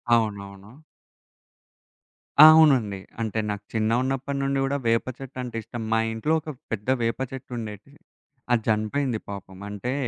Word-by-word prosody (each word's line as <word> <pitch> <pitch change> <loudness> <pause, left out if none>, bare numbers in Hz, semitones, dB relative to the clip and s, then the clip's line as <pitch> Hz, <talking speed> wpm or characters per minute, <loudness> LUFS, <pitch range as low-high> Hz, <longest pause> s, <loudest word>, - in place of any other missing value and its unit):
అవునవును. 100 -2 -3 1.8
అవునండి. 135 -11 +5 0.2
అంటే 110 0 -1
నాకు 105 0 -4
చిన్నగున్నప్పటి 130 +5 0
నుండి 135 0 0
గూడా 135 +1 0
వేప 115 0 +2
చెట్టంటే 130 -3 -7
ఇష్టం. 120 +2 -7
మా 110 - +3
ఇంట్లో 150 +8 0
ఒక 155 - -8 0.2
పెద్ద 110 +2 -3
వేప 115 +1 -1
చెట్టుండేటిది. 120 0 -8 0.5
అది 120 -2 +3
జనిపోయింది 110 +3 0
పాపం. 95 -2 -8
అంటే 105 +5 -3
115 Hz, 120 wpm, -25 LUFS, 105-135 Hz, 1.8 s, అవునండి